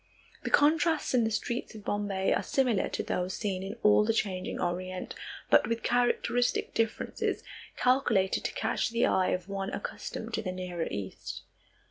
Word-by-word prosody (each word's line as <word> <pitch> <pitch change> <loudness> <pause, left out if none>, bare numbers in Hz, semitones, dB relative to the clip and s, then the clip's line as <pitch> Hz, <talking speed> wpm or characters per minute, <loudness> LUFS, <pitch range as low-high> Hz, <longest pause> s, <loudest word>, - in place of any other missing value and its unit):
The - - -3
contrasts 315 +1 +3
in 240 -3 +4
the - - +1
streets 235 +1 -3
of 210 - -10
Bombay 200 -2 0
are - - +1
similar 255 -8 +1
to - - -2
those 180 +1 -2
seen 195 -3 -2
in 195 +3 -5
all 210 0 +6
the 225 +1 +1
changing 185 -4 -1
Orient, 185 +1 -3 0.4
but - - +6
with 230 0 -1
characteristic 245 0 +1
differences 225 -1 -1 0.3
calculated 240 -7 +2
to - - -1
catch - - 0
the 235 +1 +2
eye 185 - +3
of 180 0 -1
one 195 0 -3
accustomed 485 - -5
to - - 0
the 185 -4 -3
nearer 180 -2 -3
East. 95 -2 -6
210 Hz, 165 wpm, -30 LUFS, 185-240 Hz, 0.4 s, all